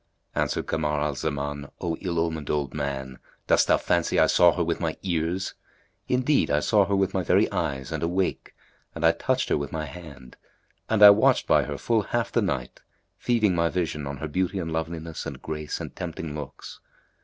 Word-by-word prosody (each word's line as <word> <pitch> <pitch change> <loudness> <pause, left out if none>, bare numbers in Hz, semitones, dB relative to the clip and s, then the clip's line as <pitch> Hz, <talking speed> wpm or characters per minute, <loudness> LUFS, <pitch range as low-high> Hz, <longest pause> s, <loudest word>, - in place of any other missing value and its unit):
Answered - - -1
Kamar 75 -2 -1
al 75 0 0
Zaman, 70 +1 -4
"O 85 -1 -2
ill 90 -3 -3
omened 80 -3 -2
old 70 -3 -1
man, 70 -3 -4 0.3
dost - - +3
thou - - +5
fancy - - 0
I - - +6
saw 90 -1 +5
her 90 - 0
with 85 0 -1
my 80 -2 -2
ears? 90 +1 -1 0.5
Indeed, 130 +3 +2
I 75 - +3
saw 100 +5 +3
her 100 - +1
with 95 0 +1
my 95 - +1
very 85 - +3
eyes 65 -1 -2
and 80 -2 -3
awake, 90 +3 -1 0.4
and 80 0 -1
I 80 - +7
touched 130 +9 -1
her - - +2
with 70 -1 -5
my 80 -1 -3
hand, 70 -5 -11 0.5
and 110 -2 +4
I 105 - +12
watched 100 +2 +3
by - - +3
her - - -5
full 115 -2 +1
half 115 +3 -2
the 120 - +2
night, 70 - -3 0.4
feeding 110 -5 +2
my 85 -1 +2
vision 80 -5 -2
on 70 0 -5
her 80 - -4
beauty 95 +5 -1
and 80 -3 -3
loveliness 80 0 -4
and - - -7
grace 75 -1 -5
and - - -7
tempting 80 -2 -5
looks. 75 -2 -8
80 Hz, 200 wpm, -26 LUFS, 75-95 Hz, 0.5 s, I